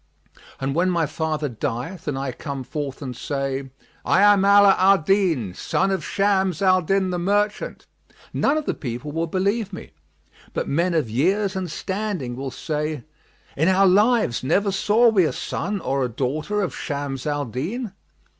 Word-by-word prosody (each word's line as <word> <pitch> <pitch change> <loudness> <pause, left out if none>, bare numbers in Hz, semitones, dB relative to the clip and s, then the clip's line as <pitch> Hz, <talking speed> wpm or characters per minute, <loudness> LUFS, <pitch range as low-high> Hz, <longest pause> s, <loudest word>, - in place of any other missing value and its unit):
And 135 0 -2
when 175 +4 +2
my 170 -3 +1
father 155 0 -2
dieth 135 - -5
and 145 -2 -1
I 135 -1 -2
come 135 +1 -6
forth 145 +1 -5
and 125 -2 -5
say, 135 +1 -3 0.3
'I - - +3
am 195 -1 +2
Ala 200 -1 +7
al 195 +1 +6
Din, 160 - +1
son 190 - 0
of 190 -5 -1
Shams 190 -2 +1
al 185 -2 +4
Din 190 +2 +1
the 180 - -2
merchant', 205 +3 -1 0.5
none 290 - +2
of 310 - -2
the - - 0
people 125 +3 -5
will 165 +2 -1
believe 200 +4 -1
me, 185 - -9 0.6
but - - -1
men 170 +4 +1
of 155 -7 +1
years 190 - +1
and 185 -2 -3
standing 190 - -3
will 135 +1 -4
say, 150 -1 -3 0.5
'In 160 +4 +2
our 190 +1 +4
lives 205 - +3
never 195 +9 +2
saw 210 +5 +3
we 200 -5 +4
a 155 - +1
son 205 0 -3
or 135 -5 -1
a 125 - -1
daughter 150 - -2
of 185 - -3
Shams 140 -3 -4
al 145 -1 -1
Din.' 185 - -4
170 Hz, 175 wpm, -23 LUFS, 140-195 Hz, 0.6 s, Ala